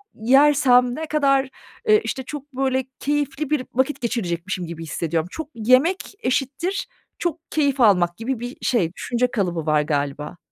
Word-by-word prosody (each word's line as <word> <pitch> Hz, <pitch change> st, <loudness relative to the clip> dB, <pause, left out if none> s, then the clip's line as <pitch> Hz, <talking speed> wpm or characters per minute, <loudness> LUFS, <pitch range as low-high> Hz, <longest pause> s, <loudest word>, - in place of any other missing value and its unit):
yersem, 250 Hz, 0 st, +4 dB
ne 320 Hz, +2 st, -4 dB
kadar, 275 Hz, -3 st, +2 dB, 0.4 s
ııı, 430 Hz, 0 st, +7 dB
işte, 265 Hz, -, -3 dB
çok, 285 Hz, +1 st, -8 dB
böyle, 265 Hz, 0 st, 0 dB
keyifli 290 Hz, 0 st, -1 dB
bir 295 Hz, -4 st, 0 dB
vakit 260 Hz, +4 st, 0 dB
geçirecekmişim 185 Hz, -6 st, -2 dB
gibi 165 Hz, 0 st, -7 dB
hissediyorum. 160 Hz, +2 st, -2 dB
Çok 315 Hz, -2 st, -6 dB
yemek 255 Hz, -, +2 dB
eşittir 290 Hz, -, -1 dB, 0.3 s
çok 335 Hz, -2 st, -4 dB
keyif 285 Hz, -3 st, +1 dB
almak 180 Hz, -5 st, +4 dB
gibi 235 Hz, +1 st, -3 dB
bir 245 Hz, +2 st, -6 dB
şey, 185 Hz, -9 st, +1 dB
düşünce 245 Hz, +3 st, -1 dB
kalıbı 175 Hz, -7 st, -1 dB
var 155 Hz, -1 st, +3 dB
galiba. 145 Hz, +2 st, -3 dB
255 Hz, 150 wpm, -22 LUFS, 180-285 Hz, 0.4 s, ııı